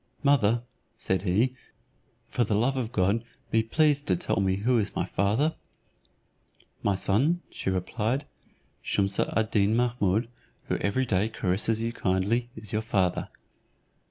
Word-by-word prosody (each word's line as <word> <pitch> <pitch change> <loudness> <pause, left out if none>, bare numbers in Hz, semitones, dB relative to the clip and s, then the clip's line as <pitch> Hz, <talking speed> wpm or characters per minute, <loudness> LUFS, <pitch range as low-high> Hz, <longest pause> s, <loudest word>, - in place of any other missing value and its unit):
"Mother," 120 -5 +3 0.3
said 95 -1 -1
he 105 +7 +2 0.7
"for 120 - 0
the 105 -1 0
love 120 +6 +2
of 120 -3 -2
God 105 +1 +1 0.3
be 115 - +4
pleased 145 +5 +2
to 95 - +3
tell 85 - -2
me 95 -1 +2
who 115 +5 +2
is 100 - -2
my - - 0
father?" 110 - +1 1.3
"My 100 - +1
son," 130 - +1
she - - -3
replied, 105 +8 -1 0.6
"Shumse 100 0 +1
ad 110 +1 0
Deen 105 +1 +3
Mahummud, 115 -3 +1 0.4
who - - +1
every 130 +6 0
day 100 -1 +1
caresses 110 +3 0
you 115 - -1
so - - -15
kindly, 100 +6 +1
is 110 -2 -7
your 110 - +1
father." 95 -5 0
110 Hz, 150 wpm, -27 LUFS, 100-120 Hz, 1.3 s, be